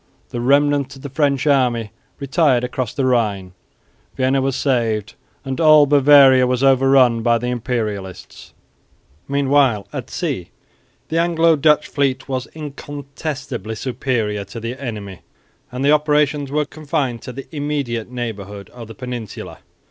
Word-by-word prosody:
The 120 - -4
remnant 140 +1 +2
of 135 - -14
the 140 - -7
French 140 -1 +1
army 125 -7 +1 0.3
retired 140 -3 +2
across 125 -2 -3
the 135 - -1
Rhine. 105 -7 0 0.6
Vienna 130 +1 +2
was 135 -1 -1
saved, 115 -7 0 0.3
and 135 +4 -3
all 155 -2 +7
Bavaria 140 -2 +6
was 125 +1 0
overrun 135 -3 +4
by 120 +1 +3
the 125 +2 -3
Imperialists. 110 -6 -5 0.7
Meanwhile 140 -6 +2
at - - -6
sea - - -3 0.6
the 165 - 0
Anglo 165 -1 +3
Dutch 150 0 +3
fleet 135 -2 -1
was 130 -2 -3
incontestably 140 - -6
superior 115 -4 -2
to 100 +4 -8
the 115 +2 -4
enemy; 105 - -6 0.5
and 125 +2 -3
the 145 - +5
operations 150 -1 +2
were 150 +1 0
confined 145 -5 -3
to - - -7
the 135 +2 -8
immediate 140 -6 -3
neighbourhood 105 -5 -6
of 120 -2 -10
the 115 - -11
Peninsula. 125 -4 -7
130 Hz, 140 wpm, -19 LUFS, 115-145 Hz, 0.7 s, all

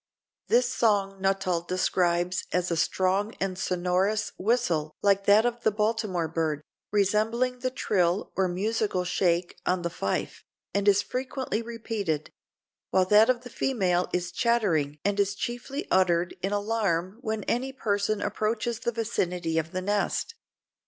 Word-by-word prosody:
This 245 +1 +4
song 195 -4 +1
Nuttall 195 -3 +1
describes 175 0 0
as 180 0 0
a - - +2
strong 190 +5 +1
and 190 -1 -1
sonorous 185 +4 0
whistle 180 -9 0
like 200 -1 +3
that 210 +3 +6
of 240 -1 -1
the - - +3
Baltimore 210 -5 0
bird, 155 -2 -2 0.3
"resembling 220 +5 +1
the 255 +1 -1
trill 185 -7 0
or 190 -1 +2
musical 200 +1 -1
shake 175 -1 0
on 180 -1 0
the 170 - -2
fife, 100 - -3 0.3
and 200 +1 0
is 200 0 +5
frequently 255 -3 -3
repeated; 220 -9 -3 0.6
while 185 -1 +3
that 210 +4 +6
of 250 -2 +2
the 245 -1 -11
female 185 -11 0
is 180 0 -2
chattering 180 - +1
and 205 0 +1
is 200 0 +1
chiefly 245 +7 -4
uttered 175 -2 +2
in 195 - -1
alarm 205 -2 -1
when 220 -4 -2
any 260 +6 -1
person 205 -4 -1
approaches 225 +2 -1
the 235 - -1
vicinity 180 -7 -1
of 160 +1 -4
the 185 0 -3
nest. 205 - 0
200 Hz, 145 wpm, -27 LUFS, 180-225 Hz, 0.6 s, that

